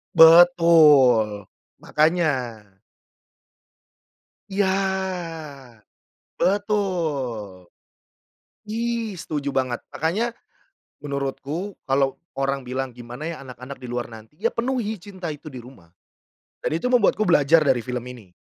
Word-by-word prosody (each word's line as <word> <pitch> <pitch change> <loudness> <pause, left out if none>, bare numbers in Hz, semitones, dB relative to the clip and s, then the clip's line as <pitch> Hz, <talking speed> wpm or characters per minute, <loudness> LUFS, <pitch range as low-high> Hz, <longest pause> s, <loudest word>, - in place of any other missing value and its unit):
Betul, 155 - +6 0.4
makanya. 160 +3 +2 2.2
Iya. 195 0 +1 1.7
Betul. 155 - -2 1.0
Ih, 230 -1 -2
setuju 145 -3 -4
banget, 130 -2 -1
makanya 210 +10 -1 0.7
menurutku 145 +7 -4
kalau 135 0 +1 0.2
orang 135 0 -1
bilang, 130 0 -3
"Gimana 120 +4 -9
ya 160 - -8
anak-anak 130 +1 -10
di 125 - -9
luar 120 0 -3
nanti?" 110 +4 -13
ya 230 +3 +1
penuhi 235 -4 -2
cinta 185 -4 -7
itu 150 +1 -10
di 130 - -8
rumah 95 -10 -16 0.7
dan - - -1
itu 210 +10 -1
membuatku 215 -3 +3
belajar 155 -1 +5
dari 130 -3 +2
film 125 0 -4
ini, 115 -8 -12
145 Hz, 100 wpm, -23 LUFS, 125-185 Hz, 2.2 s, Betul